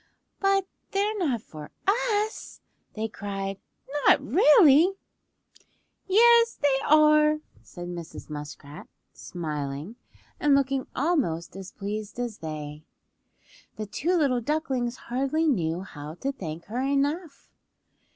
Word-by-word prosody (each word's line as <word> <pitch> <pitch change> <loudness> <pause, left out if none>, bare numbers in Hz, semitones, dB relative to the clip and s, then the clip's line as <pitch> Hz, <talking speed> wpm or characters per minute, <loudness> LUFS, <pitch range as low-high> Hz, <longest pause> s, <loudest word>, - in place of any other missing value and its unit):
"But 390 -1 +2 0.3
they're 410 +2 +1
not 260 - 0
for 150 -1 -10 0.2
us?" 430 +1 0 0.4
they 220 0 -2
cried. 195 -2 -5 0.5
"Not - - +7
really?" 300 - +6 1.1
"Yes 465 +3 +5
they 280 -2 +2
are," 305 0 +5 0.2
said 175 -1 -9
Mrs. 170 -2 -8
Muskrat, 150 0 -9 0.3
smiling, 150 - -5 0.4
and 290 -2 +4
looking 275 -1 0
almost 255 - 0
as 195 -1 -8
pleased 210 +2 -5
as 240 -3 -4
they. 150 -1 -6 0.9
The 215 - -5
two 320 - -1
little 265 -6 +2
ducklings 260 -3 -1
hardly 275 +6 -1
knew 175 - 0
how 150 -4 -9
to 270 +9 -2
thank 170 - -7
her 235 +5 -3
enough. 280 +3 -1
255 Hz, 110 wpm, -26 LUFS, -, 1.1 s, Not